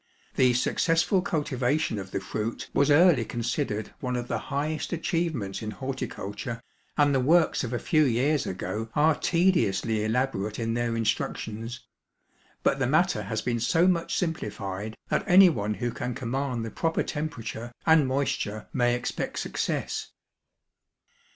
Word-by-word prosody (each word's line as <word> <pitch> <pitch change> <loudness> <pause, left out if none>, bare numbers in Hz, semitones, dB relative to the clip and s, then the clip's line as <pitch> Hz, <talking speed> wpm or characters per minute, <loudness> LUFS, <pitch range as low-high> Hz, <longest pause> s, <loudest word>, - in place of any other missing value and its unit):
The 130 -2 +4
successful 165 - +2
cultivation 145 - 0
of 95 -1 -7
the - - -2
fruit 110 +2 -4
was 140 +1 +3
early 155 -3 +6
considered 120 -1 -2
one 125 -1 -2
of 120 0 -3
the - - -1
highest 150 +2 -2
achievements 165 - -2
in 110 - -4
horticulture, 120 -2 -5 0.4
and 145 -1 +4
the 135 - +3
works 160 +6 +3
of 120 - -3
a 120 - 0
few 155 +5 +2
years 135 +3 +1
ago 95 +4 -4
are 155 +2 +5
tediously 150 - +1
elaborate 110 -3 -1
in 115 -1 -1
their 120 0 -1
instructions; 115 +1 -2 0.8
but - - +2
the - - +1
matter - - +2
has - - -3
been 120 -1 0
so 165 +9 +3
much 170 -2 +1
simplified 105 - -3
that - - +1
anyone 170 - +5
who 120 +1 -2
can 125 +1 -4
command 125 -1 -2
the 115 - -6
proper 165 -1 0
temperature 120 -6 -5
and 160 -4 +5
moisture 130 -6 -2
may 120 -2 +2
expect 125 - -3
success. - - -2
125 Hz, 145 wpm, -27 LUFS, 115-155 Hz, 0.8 s, early